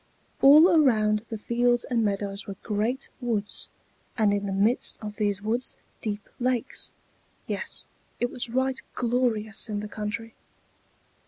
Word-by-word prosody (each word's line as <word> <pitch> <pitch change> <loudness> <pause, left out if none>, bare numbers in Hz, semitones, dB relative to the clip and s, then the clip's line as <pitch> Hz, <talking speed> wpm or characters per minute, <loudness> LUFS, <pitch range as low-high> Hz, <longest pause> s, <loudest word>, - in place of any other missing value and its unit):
All 300 +5 +9
around 225 - +3
the 225 - -4
fields 240 +2 +2
and 235 -3 0
meadows 200 0 -2
were 200 - -5
great 225 +5 -1
woods, 220 -4 -2 0.5
and 215 -3 +3
in 200 0 -1
the - - -2
midst 205 +6 +2
of 210 -1 -7
these 205 -2 0
woods 235 +4 -1 0.2
deep 210 -2 -4
lakes. 250 -2 -1 0.5
Yes, - - -2 0.3
it 245 - 0
was 240 - -3
right 260 +2 0
glorious 230 -3 +1
in 210 -1 -2
the 210 - -5
country. 215 +2 -5
220 Hz, 140 wpm, -27 LUFS, 210-245 Hz, 0.5 s, All